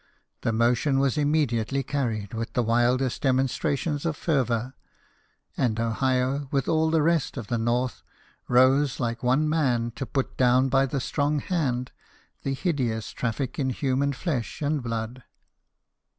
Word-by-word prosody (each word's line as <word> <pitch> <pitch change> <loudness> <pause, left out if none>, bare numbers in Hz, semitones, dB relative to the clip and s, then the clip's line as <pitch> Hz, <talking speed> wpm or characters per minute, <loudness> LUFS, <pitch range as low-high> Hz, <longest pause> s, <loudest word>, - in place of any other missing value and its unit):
The - - 0
motion 120 +5 +2
was 135 -2 +2
immediately 140 -4 +1
carried 115 -8 -2
with 115 0 -4
the 125 - +1
wildest 120 +3 +1
demonstrations 140 +3 0
of 165 -3 -1
fervour, 125 -5 0 0.8
and 115 -3 0
Ohio, 130 +4 0
with 135 -2 0
all 160 0 +2
the 160 -1 +2
rest 165 -3 +1
of 120 - -4
the 120 - 0
North, 120 +2 0 0.5
rose 130 +3 +4
like 120 -2 -2
one 130 +5 +2
man 125 -7 +1
to 135 - -4
put 135 -2 -2
down 130 +1 +4
by 135 +1 +3
the 135 +1 -2
strong 145 +3 0
hand 130 -7 -1 0.5
the 135 - -2
hideous 130 - -1
traffic 125 +3 -3
in 135 -2 +1
human 135 +2 0
flesh 135 -4 -3
and 150 -1 0
blood. 115 +1 -4
130 Hz, 145 wpm, -26 LUFS, 120-145 Hz, 0.8 s, rose